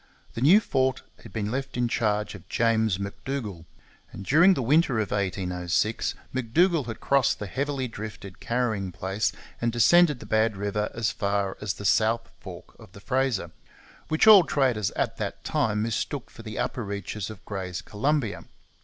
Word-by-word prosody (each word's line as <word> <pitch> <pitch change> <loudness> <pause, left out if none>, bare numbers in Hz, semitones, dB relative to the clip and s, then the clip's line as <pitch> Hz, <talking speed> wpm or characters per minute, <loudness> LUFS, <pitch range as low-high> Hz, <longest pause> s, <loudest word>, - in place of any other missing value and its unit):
The 115 - -5
new 170 +11 +7
fort 130 -10 0 0.2
had - - -12
been 105 -1 -3
left 135 0 -4
in 120 -1 +1
charge 105 -2 0
of 100 -4 -13
James 110 -4 +2
M'Dougall; 100 -2 -5 0.5
and 100 - -9
during 175 - +6
the 135 - -2
winter 140 -1 +3
of 105 - -2
1806 95 +1 -1 0.2
M'Dougall 145 +6 +2
had 115 - -6
crossed 140 -3 +2
the 105 - -5
heavily 135 +4 -2
drifted 105 -4 -8
carrying 110 -6 -1
place 95 +4 -1 0.3
and 120 0 +1
descended 150 +5 +5
the - - -10
Bad 110 0 +1
River 105 +1 -1
as 115 -1 0
far 100 -2 -1
as 105 -4 -2
the 100 - -8
south 115 +3 +2
fork - - -11
of 90 - -15
the - - -11
Fraser, 130 0 -1 0.6
which 155 +5 +2
all 210 -4 +10
traders 125 - +1
at - - -1
that - - -5
time 110 -9 0
mistook 115 +4 -3
for - - -12
the 110 -1 -7
upper 120 - -2
reaches 100 0 -5
of 110 -3 -11
Gray's 95 -3 -5
Columbia. 130 +2 -1
110 Hz, 170 wpm, -26 LUFS, 100-130 Hz, 0.6 s, all